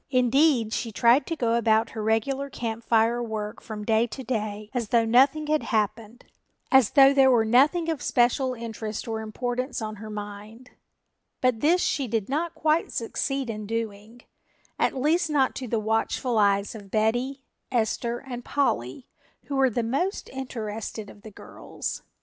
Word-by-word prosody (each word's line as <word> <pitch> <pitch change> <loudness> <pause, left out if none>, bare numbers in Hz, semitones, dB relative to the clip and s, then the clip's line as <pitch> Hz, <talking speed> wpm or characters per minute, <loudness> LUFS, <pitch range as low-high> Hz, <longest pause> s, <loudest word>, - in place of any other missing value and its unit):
Indeed, 255 -2 +3
she 230 - -2
tried 235 +6 +4
to 330 - -2
go 235 -6 0
about 225 -1 +2
her 220 - -5
regular 245 +6 0
Camp 230 -3 -5
Fire 230 +1 +2
work 220 -1 -5
from 210 -1 -7
day 225 +1 +2
to 265 +3 -8
day 215 -3 -4
as 240 -4 -2
though 235 -2 +3
nothing 270 +6 +4
had 305 0 +1
happened, 220 +1 -2 0.5
as 265 -5 +6
though 275 0 +7
there 270 -1 +5
were 235 -3 +4
nothing 285 +9 +3
of 320 -5 -2
special 250 +1 +1
interest 220 -2 -6
or 220 -1 -3
importance 245 +4 -3
on 215 -2 -5
her 215 +1 -9
mind, 210 +3 -8 0.7
but 255 -3 +1
this 340 +7 +3
she 275 -4 0
did 225 -2 -2
not 325 +4 -2
quite 315 +1 +1
succeed 270 +3 -2
in 215 -2 -5
doing, 225 +1 -5 0.6
at - - +1
least 320 +4 +2
not 275 -3 +2
to 255 - -5
the 230 0 0
watchful 225 +2 0
eyes 200 -1 +2
of 205 -3 -11
Betty, 245 +6 0 0.3
Esther 235 0 0
and 245 -2 -8
Polly, 240 - -1 0.4
who 280 - -5
were 270 -1 +4
the 240 0 -1
most 285 - -2
interested 220 -5 -5
of 205 - -17
the 220 - -10
girls. 210 - -7
235 Hz, 165 wpm, -26 LUFS, 220-265 Hz, 0.7 s, though